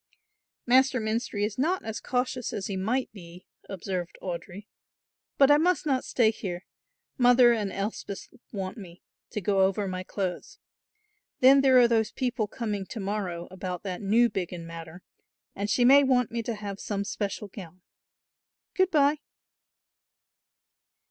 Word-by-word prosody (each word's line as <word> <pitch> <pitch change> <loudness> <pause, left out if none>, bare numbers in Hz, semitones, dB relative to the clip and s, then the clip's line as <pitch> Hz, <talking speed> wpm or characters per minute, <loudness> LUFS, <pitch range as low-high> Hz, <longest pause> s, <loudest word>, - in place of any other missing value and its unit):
"Master 260 +1 +4
Menstrie 220 -1 -1
is 210 +2 -5
not 350 +7 0
as 220 -1 -4
cautious 250 -1 -2
as 195 - -3
he 200 - -3
might 230 +8 -1
be," 175 -3 -13 0.2
observed 185 -2 -4
Audry, 185 +2 -6 0.7
"but 275 0 +6
I 290 - +6
must 355 0 +1
not 265 -4 +1
stay 225 -3 +2
here, 180 -4 -6 0.5
Mother 245 -1 +6
and 210 -4 -2
Elspeth 200 -1 -5 0.2
want 190 0 -5
me, 180 -3 -12 0.3
to 210 - -4
go 195 +1 +2
over 195 +1 +1
my 185 -1 -4
clothes. 185 -1 -5 0.8
Then 270 +2 +7
there 265 -1 +5
are 245 -1 +7
those 225 -2 +1
people 245 -4 -2
coming 210 -4 -4
to 230 - -7
morrow 190 -4 -3
about 185 -1 -5
that 185 -3 -5
Newbiggin 195 -5 +1
matter 165 +1 -9 0.5
and 200 +1 -3
she 245 +3 +3
may 280 +3 +7
want 250 -3 +2
me 235 0 -2
to 230 0 -4
have 200 -2 -6
some 200 -1 -3
special 205 0 -4
gown. 185 -2 -12 0.9
Good 375 -1 +2
bye." 295 -2 +3
210 Hz, 150 wpm, -27 LUFS, 190-250 Hz, 0.9 s, Then